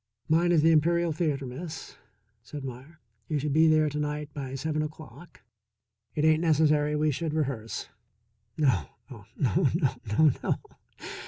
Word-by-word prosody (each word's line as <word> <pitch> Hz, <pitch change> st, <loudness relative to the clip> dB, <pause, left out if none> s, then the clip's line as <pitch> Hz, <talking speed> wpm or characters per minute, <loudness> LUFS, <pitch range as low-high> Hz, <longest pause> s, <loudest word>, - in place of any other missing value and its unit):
"Mine 170 Hz, +2 st, +3 dB
is 160 Hz, -3 st, +4 dB
the 165 Hz, -, +6 dB
Imperial 170 Hz, +2 st, +3 dB
Theatre, 150 Hz, -4 st, -1 dB
Miss," 155 Hz, +6 st, -7 dB, 0.5 s
said 140 Hz, +4 st, -8 dB
Meier. 135 Hz, +6 st, -9 dB, 0.3 s
"You 155 Hz, -, -1 dB
should 145 Hz, 0 st, -1 dB
be 160 Hz, +2 st, +5 dB
there 155 Hz, -1 st, +4 dB
to 150 Hz, 0 st, -3 dB
night 150 Hz, 0 st, -3 dB
by 135 Hz, -2 st, -5 dB
seven 155 Hz, +2 st, -2 dB
o'clock. 155 Hz, 0 st, -9 dB, 0.7 s
It 150 Hz, -, +1 dB
ain't 155 Hz, 0 st, +4 dB
necessary 150 Hz, -2 st, +3 dB
we 150 Hz, 0 st, +2 dB
should 155 Hz, +2 st, -3 dB
rehearse. 130 Hz, -8 st, -3 dB, 0.7 s
No, 125 Hz, -, +2 dB, 0.3 s
oh, -, -, -11 dB
no, -, -, +2 dB
no, -, -, +2 dB, 0.3 s
no, 155 Hz, -2 st, +6 dB
no! -, -, +1 dB
150 Hz, 155 wpm, -28 LUFS, 140-160 Hz, 0.7 s, the